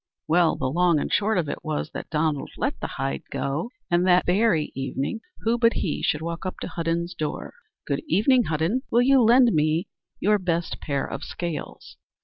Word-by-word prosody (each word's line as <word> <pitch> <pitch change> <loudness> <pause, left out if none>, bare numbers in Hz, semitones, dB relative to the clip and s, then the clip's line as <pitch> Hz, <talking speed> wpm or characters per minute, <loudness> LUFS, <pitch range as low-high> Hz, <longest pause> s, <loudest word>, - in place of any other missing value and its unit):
Well, 170 0 +3
the - - -4
long 170 +4 +3
and - - -3
the - - -2
short 210 0 +2
of 170 -4 0
it - - -5
was 155 0 -3
that - - -7
Donald 150 -2 0
let - - -2
the - - -3
hide 70 0 -3
go, 145 +11 -2 0.2
and, 175 +1 +3
that 180 0 +5
very 180 -4 +2
evening, 135 - -3 0.2
who 230 +2 +1
but 230 -1 +4
he 155 - -2
should 150 +1 0
walk 170 0 -4
up 185 - -4
to - - -3
Hudden's 170 +1 -2
door? 155 -3 -4 0.3
"Good 140 - -1
evening, 230 +7 +3
Hudden. 160 +11 0
Will 240 +1 +4
you 270 0 +5
lend 240 +1 +5
me 155 +4 +1 0.3
your 210 +1 +3
best 170 -2 -2
pair 140 -3 -1
of - - -6
scales?" 170 -3 -6
170 Hz, 195 wpm, -25 LUFS, 155-210 Hz, 0.3 s, that